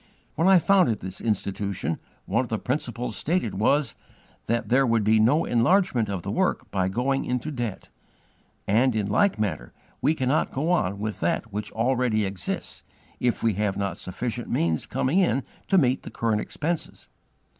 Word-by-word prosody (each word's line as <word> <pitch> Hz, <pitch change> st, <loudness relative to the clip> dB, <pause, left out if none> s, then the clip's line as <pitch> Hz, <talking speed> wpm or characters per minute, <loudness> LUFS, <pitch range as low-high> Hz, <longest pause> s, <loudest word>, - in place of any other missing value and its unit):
When 165 Hz, -, +1 dB
I 190 Hz, -1 st, +7 dB
founded 180 Hz, -, +3 dB
this 95 Hz, 0 st, -7 dB
Institution, 100 Hz, -6 st, -2 dB, 0.3 s
one 115 Hz, -, +1 dB
of 130 Hz, -, -4 dB
the 110 Hz, -, -1 dB
principles 125 Hz, -2 st, -2 dB
stated 160 Hz, -, 0 dB
was, 140 Hz, +3 st, +2 dB, 0.5 s
'that 115 Hz, +1 st, -1 dB
there 130 Hz, +3 st, +4 dB
would 115 Hz, -2 st, +2 dB
be 110 Hz, +1 st, +4 dB
no 130 Hz, +9 st, +3 dB
enlargement 120 Hz, -, +2 dB
of 95 Hz, -4 st, -3 dB
the -, -, -3 dB
work -, -, 0 dB
by 95 Hz, -2 st, 0 dB
going 135 Hz, +6 st, 0 dB
into 125 Hz, +4 st, -2 dB
debt': 120 Hz, -7 st, -4 dB, 0.8 s
and 115 Hz, +4 st, +3 dB
in 105 Hz, -2 st, 0 dB
like 110 Hz, -, +2 dB
manner 100 Hz, -, -3 dB, 0.3 s
we 145 Hz, +5 st, +3 dB
cannot 130 Hz, +2 st, +1 dB
go 155 Hz, +6 st, -1 dB
on 100 Hz, -, +1 dB
with 105 Hz, +1 st, -4 dB
that 100 Hz, +6 st, -1 dB
which 105 Hz, +1 st, -4 dB
already 120 Hz, -2 st, +1 dB
exists 95 Hz, -2 st, -4 dB, 0.4 s
if 125 Hz, -1 st, 0 dB
we 115 Hz, -2 st, +3 dB
have 105 Hz, 0 st, -1 dB
not 100 Hz, -3 st, -2 dB
sufficient 120 Hz, +5 st, -4 dB
means 80 Hz, -2 st, 0 dB
coming 145 Hz, +9 st, +1 dB
in 155 Hz, -8 st, +2 dB, 0.2 s
to 195 Hz, -, +3 dB
meet 130 Hz, -6 st, +3 dB
the -, -, -8 dB
current 110 Hz, -2 st, 0 dB
expenses." 165 Hz, +7 st, -4 dB
115 Hz, 170 wpm, -25 LUFS, 105-135 Hz, 0.8 s, I